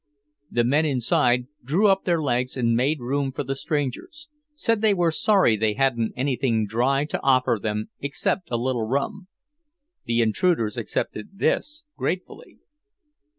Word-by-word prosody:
The 120 Hz, -, +1 dB
men 140 Hz, +6 st, +2 dB
inside 125 Hz, -3 st, +2 dB, 0.2 s
drew 170 Hz, -, +2 dB
up 195 Hz, -1 st, +2 dB
their 170 Hz, -2 st, +2 dB
legs 125 Hz, -3 st, -1 dB
and 115 Hz, -2 st, +2 dB
made 140 Hz, +6 st, +1 dB
room 135 Hz, +2 st, -1 dB
for 130 Hz, -, -4 dB
the 135 Hz, 0 st, -2 dB
strangers; 155 Hz, -, -4 dB, 0.3 s
said 230 Hz, -6 st, 0 dB
they 215 Hz, -2 st, +3 dB
were 175 Hz, -2 st, +2 dB
sorry 195 Hz, -, +3 dB
they 105 Hz, 0 st, 0 dB
hadn't 125 Hz, -4 st, +1 dB
anything 125 Hz, -4 st, 0 dB
dry 125 Hz, +7 st, +1 dB
to 150 Hz, -, -4 dB
offer 130 Hz, -4 st, +2 dB
them 105 Hz, 0 st, -3 dB
except 150 Hz, +5 st, -2 dB
a 120 Hz, -, 0 dB
little 120 Hz, -2 st, -1 dB
rum. 180 Hz, -, -2 dB, 0.8 s
The 115 Hz, -1 st, +2 dB
intruders 115 Hz, -, +1 dB
accepted 105 Hz, -, -4 dB
this 300 Hz, +9 st, 0 dB
gratefully. 185 Hz, +2 st, -4 dB
135 Hz, 150 wpm, -24 LUFS, 120-170 Hz, 0.8 s, they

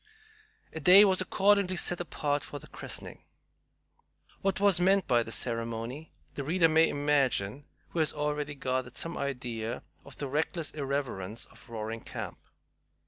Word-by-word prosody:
A 160 Hz, -, -4 dB
day 185 Hz, +6 st, +9 dB
was 190 Hz, -2 st, +2 dB
accordingly 195 Hz, 0 st, +3 dB
set 175 Hz, 0 st, 0 dB
apart 145 Hz, -4 st, -1 dB
for 145 Hz, -, -7 dB
the -, -, -11 dB
christening. -, -, -6 dB, 1.2 s
What 195 Hz, -1 st, 0 dB
was 200 Hz, -3 st, +4 dB
meant 190 Hz, +2 st, +3 dB
by 120 Hz, -1 st, +4 dB
this 115 Hz, -2 st, -2 dB
ceremony 115 Hz, +5 st, -3 dB, 0.2 s
the 140 Hz, -, -4 dB
reader 165 Hz, +4 st, +3 dB
may 160 Hz, +1 st, +4 dB
imagine 140 Hz, -4 st, +1 dB, 0.2 s
who 170 Hz, -, -3 dB
has 155 Hz, -2 st, +3 dB
already 150 Hz, -1 st, -2 dB
gathered 130 Hz, -2 st, -2 dB
some 165 Hz, +1 st, -3 dB
idea 120 Hz, -5 st, -3 dB, 0.2 s
of -, -, -10 dB
the 140 Hz, -, -3 dB
reckless 155 Hz, +3 st, -1 dB
irreverence 135 Hz, -8 st, -3 dB
of -, -, -19 dB
Roaring 110 Hz, 0 st, -4 dB
Camp. -, -, -7 dB
145 Hz, 145 wpm, -30 LUFS, 125-170 Hz, 1.2 s, day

